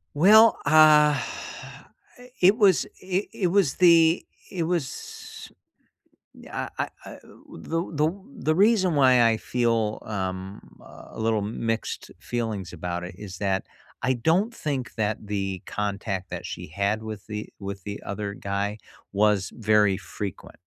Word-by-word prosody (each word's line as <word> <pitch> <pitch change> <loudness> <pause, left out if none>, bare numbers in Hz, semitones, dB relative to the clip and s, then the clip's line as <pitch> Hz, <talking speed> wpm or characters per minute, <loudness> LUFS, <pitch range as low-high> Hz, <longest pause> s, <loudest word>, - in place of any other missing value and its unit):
Well, 215 +8 +7
uh, - - +1
I 150 -1 +6 1.2
it 190 +3 +6
was 200 -6 +4 0.2
it 185 +2 -1
it 185 - 0
was 180 -5 +2
the 170 -1 +5 0.2
it 180 -3 -2
was 165 -5 -5 0.9
eh - - -4
I - - -1
uh - - -9 0.4
the 165 - -2
the 155 +1 +1 0.3
the 155 -7 +1
reason 195 -2 +4
why 130 -4 +5
I 110 -1 +2
feel, 115 -3 0
um, 95 -1 -4 0.2
a - - -13
little 110 -1 +1
mixed 115 +2 -3
feelings 110 -7 -4
about 90 0 -4
it 90 +1 -8
is 95 -3 -9
that 95 -1 0 0.4
I 130 +1 +2
don't 165 - +1
think 140 - -3
that 110 -1 -1
the 95 -3 -3
contact 100 -2 -3
that - - -6
she - - -6
had 100 +6 -1
with 110 -2 -7
the 105 0 -6
with 100 -1 -6
the 100 +2 -6
other 100 0 -4
guy 100 +1 -3 0.4
was 100 -1 +2
very 105 -3 +3
frequent. 100 -1 -7
110 Hz, 140 wpm, -25 LUFS, 100-155 Hz, 1.2 s, Well